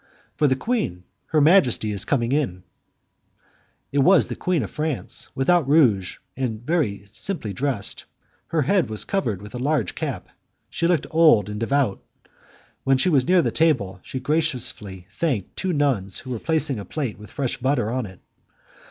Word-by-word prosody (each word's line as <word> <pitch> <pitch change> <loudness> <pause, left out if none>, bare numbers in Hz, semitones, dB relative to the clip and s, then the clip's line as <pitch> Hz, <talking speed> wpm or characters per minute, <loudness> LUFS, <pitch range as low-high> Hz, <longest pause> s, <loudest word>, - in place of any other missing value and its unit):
"For 150 - +2
the 130 - +2
queen. 130 - -2 0.2
Her 155 - +2
majesty 145 - +4
is 100 -2 +1
now - - -9
coming 120 -4 +1
in." 125 -12 -1 1.3
It 140 - +1
was 180 +8 +5
the - - -6
queen 180 -7 0
of 100 - -6
France, 155 -3 -3
without 145 +3 +2
rouge, 120 - +3 0.2
and 120 -4 -2
very 130 - 0
simply 140 - -4
dressed; 125 -6 -3 0.4
her 160 -3 +1
head 190 - +2
was 110 -1 -3
covered 115 - -2
with 105 - -11
a 125 - -5
large 135 - 0
cap; - - -4 0.4
she 170 - 0
looked 175 -2 +1
old 155 -11 +5
and 105 0 -5
devout. 125 -3 0 0.8
When 135 0 +3
she 155 - +2
was 140 -5 +2
near 180 -1 +4
the - - 0
table, 100 - +1
she 130 - -6
graciously 125 - -1
thanked 120 - -2
two 190 - -2
nuns 130 - 0
who 130 - -8
were 120 - -3
placing 155 -6 0
a 100 - -7
plate 130 -10 -4
with 105 - -12
fresh 135 -3 -2
butter 125 -4 0
on 125 -3 -2
it. 95 -1 -14
130 Hz, 175 wpm, -23 LUFS, 105-155 Hz, 1.3 s, was